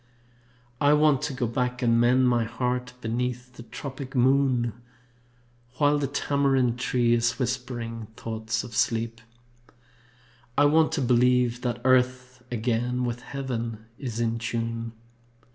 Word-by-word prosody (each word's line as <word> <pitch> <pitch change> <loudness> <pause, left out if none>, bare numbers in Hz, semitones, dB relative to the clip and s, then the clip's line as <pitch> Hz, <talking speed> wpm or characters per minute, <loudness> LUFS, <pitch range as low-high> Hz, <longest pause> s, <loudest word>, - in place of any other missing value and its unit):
I 145 0 +5
want 150 -2 +4
to 145 - -2
go 130 -1 -1
back 125 +2 -2
and 115 -1 +4
mend 125 +2 +4
my 120 -1 +2
heart 125 +2 -2
Beneath 125 +2 -3
the 125 - -11
tropic 130 +3 -8
moon, 130 -2 +3 1.0
While 145 0 +3
the 140 - 0
tamarind 135 -3 +1
tree 120 -1 +2
is 120 0 +1
whispering 120 -3 -3
thoughts 110 0 -3
of 120 -3 -9
sleep. 115 +1 0 1.4
I 145 - +6
want 155 +2 +4
to 145 - 0
believe 125 -1 +3
that 120 -1 -2
Earth 130 0 +2
again 120 +1 -1
With 120 0 -3
Heaven 120 -5 -5
is 120 -5 -4
in 115 0 0
tune. 115 0 -3
125 Hz, 130 wpm, -26 LUFS, 115-130 Hz, 1.4 s, I